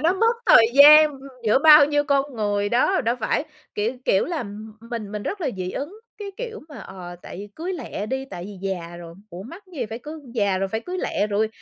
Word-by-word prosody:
nó 325 +4 +3
mất 455 +4 +2
thời 230 - +7
gian, 300 +2 +9
ưm, 270 - -13 0.2
giữa 215 +3 +3
bao 300 0 +8
nhiêu 290 0 0
con 280 -1 0
người 205 -1 -1
đó. 255 - +2
Đâu 235 +1 -1
phải, 255 - -1 0.3
kiểu 215 +3 -1
kiểu 190 - +2
là, 330 -5 -3
m 210 0 -9 0.2
mình 220 -4 -5
mình 210 -1 -5
rất 400 - -5
là 305 - -1
dị 185 0 -4
ứng, 340 +10 -6 0.2
cái 410 -1 -6
kiểu 465 -2 -6
mà, 295 - -11
ờ, 180 -2 -10
tại - - -10
vì 205 +2 -8
cưới 350 +4 -5
lẹ 265 - -6
đi, 265 +3 -3
tại 175 - -7
vì 200 0 -10
già 175 -2 -5
rồi, 170 -1 -11 0.2
ủa 180 +2 -8
mắc 335 - -11
gì 260 -8 -4
phải 225 +2 -7
cưới? 305 +3 -9
Già 200 -4 +1
rồi 195 +1 -2
phải 220 +3 -3
cưới 365 +7 -6
lẹ 205 - -1
rồi, 215 +1 0
235 Hz, 245 wpm, -22 LUFS, 205-310 Hz, 0.3 s, gian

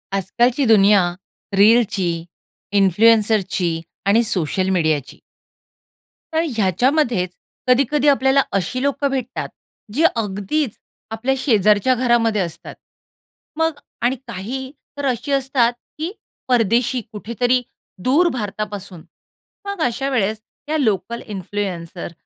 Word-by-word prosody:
आजकालची 240 +8 +1
दुनिया 205 -3 +6 0.6
रीलची, 210 -3 +4 0.7
इन्फ्लुएन्सरची 195 -4 +3 0.2
आणि 215 +4 +4
सोशल 185 -2 0
मीडियाची. 155 -7 0 1.2
तर 320 +1 +2
ह्याच्यामध्येच 225 - +1 0.4
कधी-कधी 275 +3 +3
आपल्याला 275 -1 +4 0.2
अशी 225 +7 -2
लोकं 280 0 0
भेटतात, 255 -2 -3 0.4
जे 310 +7 +3
अगदीच 215 +5 -2 0.3
आपल्या 235 +4 0
शेजारच्या 215 -2 +3
घरामध्ये 235 -4 +2
असतात. 170 -3 -6 0.8
मग 320 -2 0 0.2
आणि 245 +2 +2
काही 245 +6 -5 0.3
तर 285 - -3
अशी 260 +2 -1
असतात, 265 -3 +2 0.2
की 320 +4 -3 0.4
परदेशी 240 +1 +2
कुठेतरी 235 +4 0 0.4
दूर 300 +8 +4
भारतापासून. 205 -5 -5 0.6
मग 400 -3 -4
अशा 250 +3 -1
वेळेस 220 -4 0 0.3
या 315 - +1
लोकल 225 - -1
इन्फ्लुएन्सर 185 -4 -5
230 Hz, 100 wpm, -20 LUFS, 195-260 Hz, 1.2 s, दुनिया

